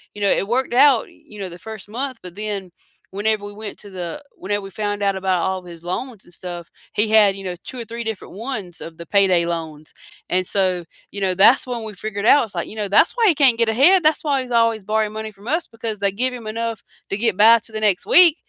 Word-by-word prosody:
you 205 Hz, -, -8 dB
know, 200 Hz, -, +3 dB
it 195 Hz, -, +1 dB
worked 245 Hz, +2 st, -1 dB
out, 260 Hz, -1 st, +4 dB
you 210 Hz, -1 st, -16 dB
know, 190 Hz, -, -4 dB
the 175 Hz, 0 st, -11 dB
1st 215 Hz, -2 st, -9 dB
month, 255 Hz, +2 st, -4 dB
but 180 Hz, -1 st, -9 dB
then 205 Hz, -3 st, -5 dB, 0.5 s
whenever 215 Hz, 0 st, 0 dB
we 205 Hz, -, -8 dB
went 210 Hz, -, -6 dB
to 205 Hz, -, -11 dB
the 175 Hz, -3 st, -5 dB, 0.3 s
whenever 205 Hz, +2 st, -1 dB
we 195 Hz, -, -8 dB
found 205 Hz, 0 st, -2 dB
out 195 Hz, -1 st, +1 dB
about 190 Hz, -2 st, 0 dB
all 190 Hz, 0 st, -1 dB
of 180 Hz, -, -17 dB
his 165 Hz, -, -14 dB
loans 215 Hz, +5 st, -5 dB
and 175 Hz, -, -16 dB
stuff, 175 Hz, -1 st, -8 dB, 0.2 s
he 215 Hz, +1 st, +2 dB
had, 210 Hz, -3 st, +5 dB
you 195 Hz, -, -8 dB
know, 180 Hz, -, -3 dB
2 255 Hz, -, -8 dB
or -, -, -7 dB
3 230 Hz, +2 st, -6 dB
different 220 Hz, -5 st, -5 dB
ones 210 Hz, -6 st, -6 dB
of 165 Hz, -, -8 dB
the 170 Hz, -, -9 dB
payday 185 Hz, -4 st, +4 dB
loans. 160 Hz, -3 st, -5 dB, 0.4 s
And 185 Hz, 0 st, +1 dB
so, 185 Hz, -3 st, 0 dB, 0.3 s
you 200 Hz, -, -5 dB
know, 185 Hz, -1 st, +1 dB
that's 230 Hz, +8 st, +5 dB
when 240 Hz, -2 st, -4 dB
we 220 Hz, -, -6 dB
figured 205 Hz, +1 st, -5 dB
out, 285 Hz, +2 st, +6 dB
it's, 215 Hz, -, -15 dB
like, -, -, -3 dB
you -, -, -10 dB
know, 205 Hz, -1 st, -2 dB
"That's 200 Hz, -, +4 dB
why 460 Hz, -2 st, +4 dB
he 340 Hz, -, +4 dB
can't 270 Hz, -5 st, +4 dB
get 230 Hz, -1 st, +2 dB
ahead, 360 Hz, +10 st, +6 dB
that's 310 Hz, 0 st, +2 dB
why 285 Hz, -3 st, +1 dB
he 260 Hz, -, -2 dB
was 250 Hz, -, -12 dB
always 225 Hz, -3 st, +1 dB
borrowing 215 Hz, 0 st, 0 dB
money 220 Hz, 0 st, -6 dB
from 200 Hz, +3 st, -16 dB
us, 330 Hz, +2 st, -1 dB
because 225 Hz, -2 st, -5 dB
they 200 Hz, -1 st, +1 dB
give 250 Hz, +5 st, +1 dB
him 235 Hz, -3 st, -8 dB
enough 230 Hz, 0 st, -4 dB, 0.3 s
to 195 Hz, -, -1 dB
get 225 Hz, -2 st, +1 dB
by 225 Hz, +2 st, +7 dB
to 220 Hz, -, -10 dB
the 215 Hz, -, -3 dB
next 185 Hz, -3 st, +1 dB
week, 350 Hz, -4 st, +6 dB
210 Hz, 265 wpm, -20 LUFS, 190-230 Hz, 0.5 s, by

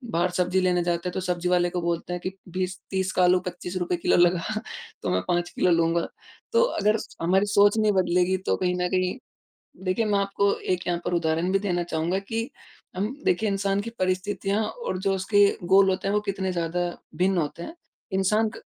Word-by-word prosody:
बाहर 175 Hz, +2 st, +2 dB
सब्ज़ी 180 Hz, +1 st, +2 dB
लेने 180 Hz, -1 st, +2 dB
जाते 175 Hz, +1 st, -1 dB
तो 190 Hz, -, -3 dB
सब्ज़ी 180 Hz, -1 st, -1 dB
वाले 175 Hz, -1 st, +3 dB
को 175 Hz, 0 st, -3 dB
बोलते 170 Hz, +1 st, -2 dB
हैं 180 Hz, -, -3 dB
कि 185 Hz, -, -3 dB, 0.3 s
20-30 185 Hz, +1 st, -2 dB
का 180 Hz, -, +3 dB
आलू 180 Hz, +1 st, +5 dB
₹25 180 Hz, 0 st, -3 dB
किलो -, -, +2 dB
लगा 175 Hz, +5 st, +2 dB, 0.4 s
तो -, -, -2 dB
मैं 90 Hz, 0 st, +1 dB
5 175 Hz, 0 st, 0 dB
किलो 180 Hz, -, +1 dB
लूँगा। 165 Hz, 0 st, +2 dB, 0.5 s
तो 470 Hz, -, +5 dB, 0.2 s
अगर 210 Hz, +2 st, +3 dB, 0.2 s
हमारी 190 Hz, +4 st, +3 dB
सोच 205 Hz, +1 st, +4 dB
नहीं 215 Hz, -1 st, +3 dB
बदलेगी 180 Hz, 0 st, +2 dB
तो -, -, +3 dB
कहीं 180 Hz, -1 st, 0 dB
न 180 Hz, -, +1 dB
कहीं 185 Hz, +4 st, 0 dB, 0.7 s
देखिए 185 Hz, +5 st, +1 dB
मैं 205 Hz, -1 st, +1 dB
आपको 200 Hz, 0 st, +1 dB
एक 180 Hz, -1 st, -2 dB
यहाँ 175 Hz, -1 st, 0 dB
पर -, -, -2 dB
उदाहरण 165 Hz, +1 st, 0 dB
भी 195 Hz, -, +4 dB
देना 180 Hz, -3 st, -1 dB
चाहूँगा 170 Hz, +2 st, -1 dB
कि 225 Hz, +4 st, -3 dB, 0.5 s
हम 210 Hz, +7 st, -2 dB
देखिए 210 Hz, +4 st, +2 dB
इंसान 195 Hz, 0 st, 0 dB
की 230 Hz, -, -5 dB
परिस्थितियाँ 195 Hz, +2 st, 0 dB
और 475 Hz, -, -4 dB
जो 195 Hz, 0 st, 0 dB
उसके 200 Hz, +2 st, +4 dB, 0.3 s
गोल 195 Hz, 0 st, +7 dB
होते 185 Hz, +1 st, -1 dB
हैं 200 Hz, -, 0 dB
वो 210 Hz, -, +3 dB
कितने 195 Hz, -2 st, -2 dB
ज़्यादा 170 Hz, 0 st, -2 dB, 0.4 s
भिन्न 185 Hz, +1 st, +2 dB
होते 165 Hz, +1 st, -3 dB
हैं। 325 Hz, -, -7 dB, 0.4 s
इंसान 210 Hz, +4 st, +2 dB
का 215 Hz, -, -10 dB
185 Hz, 200 wpm, -25 LUFS, 175-200 Hz, 0.7 s, गोल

